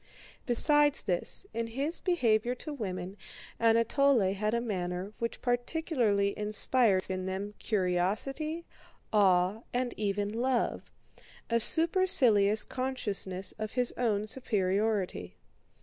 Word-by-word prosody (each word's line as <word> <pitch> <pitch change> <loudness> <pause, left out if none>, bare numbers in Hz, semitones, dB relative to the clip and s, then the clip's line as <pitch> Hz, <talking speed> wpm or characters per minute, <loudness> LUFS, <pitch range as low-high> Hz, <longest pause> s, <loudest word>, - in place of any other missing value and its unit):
Besides 295 +4 +4
this, 180 - -3
in 230 0 -3
his 280 +8 -3
behavior 245 - 0
to 300 +4 -7
women 190 -6 -6 0.4
Anatole 230 -1 +2
had 210 +3 -2
a - - 0
manner 185 -3 -4
which 230 0 -5
particularly 245 -5 -1
inspires 210 -1 +1
in 185 0 -4
them 195 +2 -5
curiosity, 215 - -2 0.5
awe, 190 0 +2 0.2
and 250 0 -1
even 205 -1 -2
love—a 235 -1 -4
supercilious 245 - +5
consciousness 205 -8 -3
of 215 0 -5
his 250 -1 +1
own 215 -4 -1
superiority. 200 - -2
220 Hz, 100 wpm, -29 LUFS, 195-255 Hz, 0.5 s, supercilious